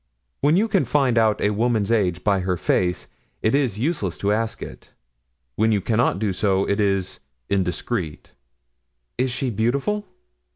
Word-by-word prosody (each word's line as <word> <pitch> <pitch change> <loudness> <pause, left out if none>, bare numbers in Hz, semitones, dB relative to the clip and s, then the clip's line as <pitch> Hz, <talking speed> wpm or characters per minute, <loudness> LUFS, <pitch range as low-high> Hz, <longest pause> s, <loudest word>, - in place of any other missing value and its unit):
When 150 +4 +3
you 215 +4 +3
can 200 -4 +2
find 135 -5 +1
out 110 -2 +3
a 105 - +2
woman's 110 -1 +1
age 90 -6 +1
by 100 -2 +2
her 90 -1 -1
face, 90 0 0 0.4
it 110 - +2
is 135 -8 +1
useless 115 - -1
to 100 - 0
ask 110 +1 -1
it; - - -11 0.6
when 110 +1 +3
you 105 - +2
cannot 110 0 +1
do 100 -1 -1
so, 95 0 +1
it 100 - 0
is 95 -2 0 0.3
indiscreet." 90 -2 -2 0.9
"Is 130 +1 +2
she 125 +1 -2
beautiful?" 140 - -1
110 Hz, 160 wpm, -23 LUFS, 95-125 Hz, 0.9 s, When